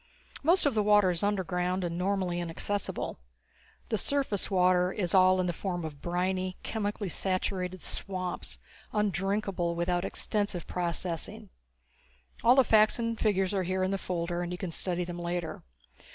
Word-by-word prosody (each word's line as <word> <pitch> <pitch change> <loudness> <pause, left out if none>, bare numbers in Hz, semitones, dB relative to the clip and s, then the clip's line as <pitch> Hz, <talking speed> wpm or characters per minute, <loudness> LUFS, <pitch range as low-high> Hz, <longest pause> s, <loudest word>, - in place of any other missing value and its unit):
Most 340 +5 +3
of 285 - +3
the 215 - +2
water 205 -2 +5
is 170 - -2
underground 185 -2 0
and 170 -1 -2
normally 180 -1 0
inaccessible. 175 - -2 0.7
The 220 - 0
surface 270 -7 0
water 180 -1 +3
is 180 -5 -1
all 185 0 +6
in 185 - +2
the 175 - 0
form 175 -2 -3
of 145 -3 -7
briny, 185 +2 -1
chemically 210 -2 -2
saturated 185 0 -1
swamps 185 -2 -3 0.4
undrinkable 195 -3 0
without 175 +1 0
extensive 200 -3 -2
processing. 180 +4 -3 0.9
All 245 +2 +7
the 265 - +7
facts 215 -2 +5
and 230 -1 -2
figures 195 -3 +2
are 195 - +1
here 185 +1 0
in 190 - +1
the 195 - -1
folder 175 -1 -2
and 175 0 -3
you 180 - -3
can 180 -2 -4
study 180 +1 -1
them 175 0 -6
later. 175 -1 -3
185 Hz, 155 wpm, -30 LUFS, 175-205 Hz, 0.9 s, All